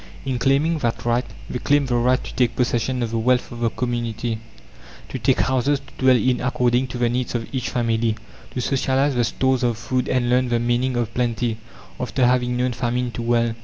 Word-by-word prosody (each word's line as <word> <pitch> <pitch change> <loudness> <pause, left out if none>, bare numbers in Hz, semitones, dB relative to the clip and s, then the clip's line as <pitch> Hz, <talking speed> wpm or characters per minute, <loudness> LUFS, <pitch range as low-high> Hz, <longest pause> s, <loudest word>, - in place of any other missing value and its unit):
In 130 -2 -1
claiming 145 +5 +2
that 115 -3 -2
right 120 +1 +1 0.2
they 125 - -4
claim 145 +2 +2
the 125 - -2
right 125 +2 +2
to - - -8
take 125 -2 +1
possession 125 0 0
of 115 - -3
the 115 - 0
wealth 125 +2 +1
of 120 - -7
the 115 -1 +1
community 120 -2 -2 0.7
to - - -4
take - - +2
houses 130 +2 +1
to 135 +1 -18
dwell 130 -1 +6
in 125 +1 +1
according 125 0 +1
to 125 - -6
the 120 -1 +2
needs 125 +1 -2
of 115 -2 -2
each 130 -2 -2
family; 115 -2 0 0.3
to 125 - -4
socialize 135 +2 +1
the 120 -1 +2
stores 130 +2 +1
of 120 -3 +1
food 125 +2 -2
and 125 -1 +1
learn 125 +1 +2
the 120 - +2
meaning 120 +2 0
of 120 -1 -2
plenty, 120 -2 -1 0.4
after 125 0 +1
having 125 0 +2
known 125 0 +1
famine 125 0 -1
too 120 - -5
well. 115 0 +1
125 Hz, 210 wpm, -22 LUFS, 120-130 Hz, 0.7 s, dwell